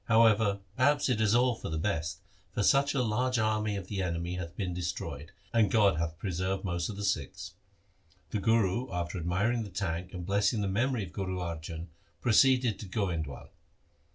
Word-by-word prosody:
However, 110 Hz, -3 st, +4 dB
perhaps 145 Hz, +2 st, +3 dB
it 115 Hz, -4 st, +1 dB
is 110 Hz, 0 st, +3 dB
all 125 Hz, +1 st, +4 dB
for 110 Hz, -, -6 dB
the 80 Hz, -, -2 dB
best, 85 Hz, 0 st, -2 dB, 0.3 s
for 105 Hz, -, +1 dB
such 140 Hz, +5 st, +4 dB
a 130 Hz, -, +2 dB
large 125 Hz, +3 st, +1 dB
army 110 Hz, -1 st, +1 dB
of 100 Hz, -2 st, -4 dB
the 95 Hz, 0 st, -3 dB
enemy 85 Hz, -1 st, -2 dB
hath 85 Hz, -1 st, -6 dB
been 90 Hz, -3 st, -2 dB
destroyed, 80 Hz, -4 st, -4 dB, 0.2 s
and 110 Hz, -4 st, +4 dB
God 100 Hz, -5 st, +4 dB
hath 85 Hz, 0 st, -2 dB
preserved 95 Hz, +1 st, -2 dB
most 85 Hz, -3 st, -1 dB
of 105 Hz, -, -5 dB
the 100 Hz, -, -5 dB
Sikhs.' 80 Hz, -8 st, -2 dB, 0.8 s
The 105 Hz, -, 0 dB
Guru 110 Hz, +1 st, +2 dB
after 90 Hz, 0 st, -3 dB
ad 85 Hz, -, -4 dB
miring 105 Hz, +7 st, +1 dB
the 105 Hz, -, -5 dB
tank 90 Hz, -1 st, -3 dB
and 90 Hz, -2 st, -6 dB
blessing 100 Hz, +3 st, +2 dB
the 100 Hz, -, 0 dB
memory 115 Hz, +4 st, 0 dB
of 90 Hz, -, -9 dB
Guru 95 Hz, -2 st, -3 dB
Arjan 85 Hz, -1 st, -5 dB, 0.3 s
proceeded 125 Hz, -1 st, +4 dB
to 105 Hz, -, -7 dB
Goindwal. 85 Hz, -, -3 dB
100 Hz, 185 wpm, -30 LUFS, 85-110 Hz, 0.8 s, However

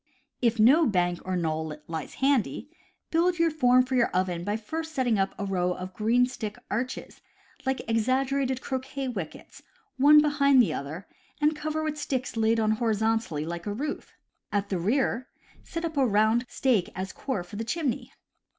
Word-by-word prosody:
If 235 Hz, -2 st, +2 dB
no 280 Hz, +9 st, +6 dB
bank 175 Hz, -4 st, +1 dB
or 185 Hz, 0 st, -1 dB
knoll 160 Hz, -2 st, -2 dB
lies 160 Hz, -3 st, -5 dB
handy, 275 Hz, +1 st, 0 dB, 0.4 s
build 345 Hz, +1 st, +2 dB
a 335 Hz, -1 st, +3 dB
form 255 Hz, -4 st, +4 dB
for 260 Hz, -, -5 dB
your 245 Hz, -2 st, +4 dB
oven 180 Hz, -2 st, -1 dB
by 205 Hz, +3 st, -1 dB
first 320 Hz, +8 st, -5 dB
setting 245 Hz, -5 st, +2 dB
up 195 Hz, 0 st, 0 dB
a 200 Hz, -, -3 dB
row 180 Hz, -2 st, 0 dB
of 185 Hz, +1 st, -7 dB
green 230 Hz, +5 st, +3 dB
stick 220 Hz, -5 st, -6 dB
arches, 245 Hz, +5 st, -4 dB, 0.5 s
like 265 Hz, 0 st, -1 dB
exaggerated 260 Hz, +3 st, +1 dB
croquet 265 Hz, 0 st, -4 dB
wickets, 190 Hz, -10 st, -7 dB, 0.4 s
one 295 Hz, +3 st, +8 dB
behind 280 Hz, -2 st, +4 dB
the 240 Hz, -, +4 dB
other, 155 Hz, +7 st, -6 dB, 0.3 s
and 300 Hz, +1 st, +2 dB
cover 310 Hz, +1 st, -2 dB
with 305 Hz, -1 st, -3 dB
sticks 265 Hz, -4 st, -2 dB
laid 225 Hz, 0 st, +2 dB
on 215 Hz, -1 st, +2 dB
horizontally 220 Hz, -7 st, 0 dB
like 170 Hz, +3 st, -5 dB
a 205 Hz, -, -1 dB
roof. 295 Hz, +7 st, -4 dB, 0.4 s
At 205 Hz, -1 st, -1 dB
the 185 Hz, -, -1 dB
rear, 250 Hz, +5 st, 0 dB, 0.4 s
set 335 Hz, 0 st, -4 dB
up 320 Hz, -1 st, -4 dB
a 270 Hz, -2 st, +4 dB
round 220 Hz, +3 st, +2 dB
stake 230 Hz, -10 st, +1 dB
as 190 Hz, +1 st, -4 dB
core 235 Hz, -10 st, -3 dB
for 190 Hz, +3 st, -10 dB
the 225 Hz, -, -2 dB
chimney. 260 Hz, +1 st, -2 dB
235 Hz, 175 wpm, -27 LUFS, 195-275 Hz, 0.5 s, one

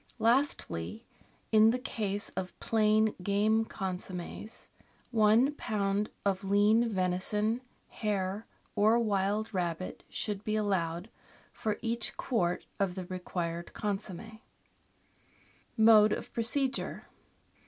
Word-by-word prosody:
Lastly, 230 Hz, -, 0 dB, 0.5 s
in 220 Hz, 0 st, +7 dB
the 240 Hz, -, +2 dB
case 205 Hz, -5 st, -2 dB
of 185 Hz, -1 st, -6 dB
plain 215 Hz, -1 st, +3 dB
game 210 Hz, +4 st, +2 dB
consommes, 185 Hz, +2 st, -5 dB, 0.4 s
one 225 Hz, +4 st, +5 dB
lb. 210 Hz, -6 st, -1 dB, 0.2 s
of 195 Hz, 0 st, +1 dB
lean 210 Hz, +4 st, +4 dB
venison, 210 Hz, +4 st, 0 dB, 0.3 s
hare, 205 Hz, -1 st, -2 dB, 0.3 s
or 215 Hz, +2 st, +5 dB
wild 210 Hz, -1 st, 0 dB
rabbit 175 Hz, -1 st, -3 dB
should 205 Hz, -1 st, -3 dB
be 215 Hz, 0 st, -1 dB
allowed 185 Hz, -2 st, -1 dB, 0.4 s
for 215 Hz, -1 st, -2 dB
each 230 Hz, 0 st, -1 dB
quart 180 Hz, -8 st, 0 dB
of 195 Hz, -3 st, 0 dB
the 185 Hz, -2 st, -5 dB
required 175 Hz, -2 st, -4 dB
consomm6. 210 Hz, +1 st, -4 dB, 1.4 s
Mode 220 Hz, -1 st, +7 dB
of -, -, -5 dB
Procedure. 260 Hz, +3 st, -1 dB
210 Hz, 100 wpm, -31 LUFS, 190-225 Hz, 1.4 s, in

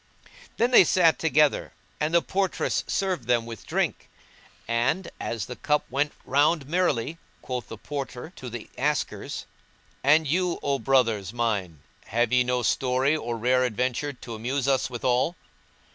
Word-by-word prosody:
Then 240 Hz, +2 st, +2 dB
they 240 Hz, -, +9 dB
sat 170 Hz, -1 st, +4 dB
together, 150 Hz, -2 st, +2 dB, 0.3 s
and 150 Hz, +1 st, 0 dB
the 170 Hz, -, +4 dB
portress 190 Hz, -1 st, 0 dB
served 185 Hz, -11 st, -1 dB
them 120 Hz, -2 st, +2 dB
with 115 Hz, -3 st, -9 dB
drink; -, -, -1 dB, 0.6 s
and, 120 Hz, +10 st, 0 dB
as 115 Hz, -3 st, -3 dB
the 125 Hz, -, -7 dB
cup 150 Hz, 0 st, +1 dB
went 145 Hz, +3 st, +1 dB
round 145 Hz, +1 st, +2 dB
merrily, 165 Hz, -3 st, 0 dB, 0.2 s
quoth 125 Hz, -1 st, -4 dB
the 115 Hz, -, -8 dB
Porter 140 Hz, -, -6 dB
to 125 Hz, -, -7 dB
the 120 Hz, -1 st, -7 dB
askers, 150 Hz, +2 st, -2 dB, 0.6 s
"And 155 Hz, +3 st, +5 dB
you, 175 Hz, +4 st, +1 dB
O 140 Hz, -1 st, 0 dB
brothers 115 Hz, -8 st, +2 dB
mine, 100 Hz, -10 st, -2 dB, 0.2 s
have 120 Hz, +2 st, 0 dB
ye 125 Hz, 0 st, +5 dB
no 125 Hz, 0 st, 0 dB
story 130 Hz, +4 st, +2 dB
or 120 Hz, -6 st, -3 dB
rare 125 Hz, +3 st, +2 dB
adventure 125 Hz, +4 st, -1 dB
to 120 Hz, -3 st, -9 dB
amuse 125 Hz, +5 st, -2 dB
us 135 Hz, -1 st, +2 dB
withal?" 125 Hz, +6 st, 0 dB
130 Hz, 150 wpm, -26 LUFS, 120-150 Hz, 0.6 s, they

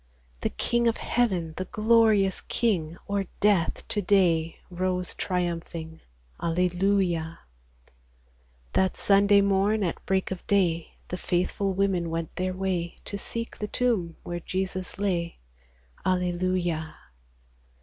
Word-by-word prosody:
The -, -, 0 dB
King 235 Hz, 0 st, +1 dB
of 230 Hz, -, +2 dB
heaven, 185 Hz, -10 st, 0 dB
the 185 Hz, -, -2 dB
glorious 215 Hz, -2 st, +3 dB
King, 175 Hz, -8 st, 0 dB
O'er 200 Hz, -1 st, 0 dB
death 200 Hz, -5 st, +2 dB
to 210 Hz, -, 0 dB
day 175 Hz, -4 st, +3 dB
rose 180 Hz, 0 st, -1 dB
triumphing: 170 Hz, -2 st, -3 dB, 0.4 s
Alleluia! 175 Hz, -1 st, +1 dB, 1.3 s
That 190 Hz, 0 st, +2 dB
Sunday 200 Hz, 0 st, +5 dB
morn, 200 Hz, +2 st, +2 dB
at 175 Hz, -, -2 dB
break 190 Hz, 0 st, +1 dB
of 185 Hz, -, -4 dB
day, 175 Hz, -5 st, +1 dB
The 180 Hz, -, -3 dB
faithful 185 Hz, +2 st, 0 dB
women 185 Hz, -3 st, +1 dB
went 165 Hz, -1 st, -3 dB
their 185 Hz, 0 st, -1 dB
way 185 Hz, -3 st, -2 dB
To 200 Hz, -, -3 dB
seek 230 Hz, +3 st, -5 dB
the 210 Hz, -, -2 dB
tomb 210 Hz, -9 st, 0 dB
where 175 Hz, 0 st, -4 dB
Jesus 185 Hz, +1 st, -3 dB
lay. 175 Hz, -4 st, -1 dB, 0.7 s
Alleluia 180 Hz, -3 st, 0 dB
185 Hz, 120 wpm, -27 LUFS, 170-200 Hz, 1.3 s, Sunday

